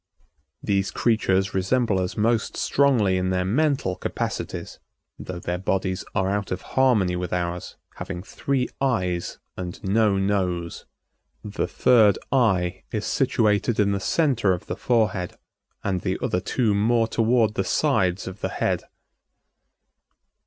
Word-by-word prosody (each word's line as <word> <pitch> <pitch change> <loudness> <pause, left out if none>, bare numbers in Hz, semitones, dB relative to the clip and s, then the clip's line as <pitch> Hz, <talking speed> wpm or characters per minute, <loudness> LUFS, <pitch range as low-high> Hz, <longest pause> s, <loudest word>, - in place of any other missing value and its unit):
These 100 -1 +1
creatures 95 -5 +1
resemble 100 +2 +1
us 90 -1 -3
most 115 +2 +1
strongly 120 -10 +2
in 90 0 0
their 90 0 0
mental 135 -2 +1
capacities, - - -4 0.4
though 90 - -6
their 85 +1 -3
bodies 95 0 -1
are 95 -2 +1
out 100 +1 -2
of 90 0 -3
harmony 115 -9 +3
with 90 0 -4
ours, 90 0 -3 0.2
having 90 -2 -6
three 130 +3 -1
eyes 90 -10 -1 0.2
and 90 -2 -6
no 105 0 +2
nose. 90 -4 -1 0.6
The 105 -1 -3
third 110 -6 +4
eye 95 -9 +2
is - - -2
situated 105 +1 +1
in 100 -1 +3
the 100 - 0
center 120 - +2
of 90 - -5
the - - -4
forehead, 105 -7 0 0.5
and 95 -3 -1
the - - -1
other 90 - 0
two 115 0 +1
more 115 +3 +2
toward 115 -1 +2
the 95 - -1
sides 95 -6 +1
of 95 +2 -8
the - - -1
head. - - -1
100 Hz, 140 wpm, -24 LUFS, 90-115 Hz, 0.6 s, third